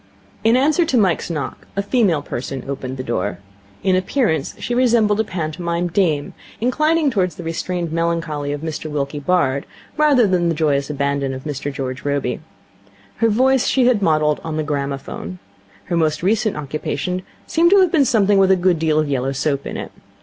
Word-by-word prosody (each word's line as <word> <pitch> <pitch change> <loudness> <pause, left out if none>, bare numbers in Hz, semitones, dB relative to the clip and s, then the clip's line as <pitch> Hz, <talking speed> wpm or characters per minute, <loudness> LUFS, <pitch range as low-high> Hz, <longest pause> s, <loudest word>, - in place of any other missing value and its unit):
In 225 +3 +4
answer 305 +6 +3
to 265 -6 +1
Mike's 190 -7 +1
knock, 155 -4 -5
a 200 - 0
female 200 - +2
person 130 0 -5
opened 135 -1 -5
the 130 - -4
door. 90 -7 -2 0.5
In 190 -1 +3
appearance 185 - 0
she 245 - -3
resembled 230 -4 +3
a - - +3
pantomime 170 -1 -3
'dame', 160 -5 0 0.3
inclining 305 +5 +2
towards 185 -7 0
the - - -8
restrained 170 +1 -3
melancholy 165 -3 -1
of 145 0 -4
Mr 160 -1 -4
Wilkie 145 0 -3
Bard 140 -4 +1 0.3
rather 290 -6 +5
than 180 -3 +2
the 165 - 0
joyous 145 -3 +1
abandon 140 -2 -1
of 130 - -8
Mr 145 -1 -4
George 130 -1 -5
Robey. 145 -1 -1 0.8
Her 230 0 +3
voice 260 +4 +3
she 260 -2 +3
had 245 -4 +3
modelled 155 -4 +2
on 160 -1 -4
the 155 - 0
gramophone. 140 - -4 0.5
Her 175 - -3
most 160 -1 +1
recent 215 +2 +1
occupation 155 +4 -3 0.2
seemed 335 +1 +3
to 395 +1 +6
have 365 -3 +3
been 295 -5 +4
something 205 -4 +3
with 190 -1 +4
a 190 - +6
good 180 -2 +2
deal 155 -1 +1
of 155 -1 +2
yellow 135 -1 -1
soap 140 0 -1
in - - -5
it. - - -6
165 Hz, 185 wpm, -20 LUFS, 145-215 Hz, 0.8 s, to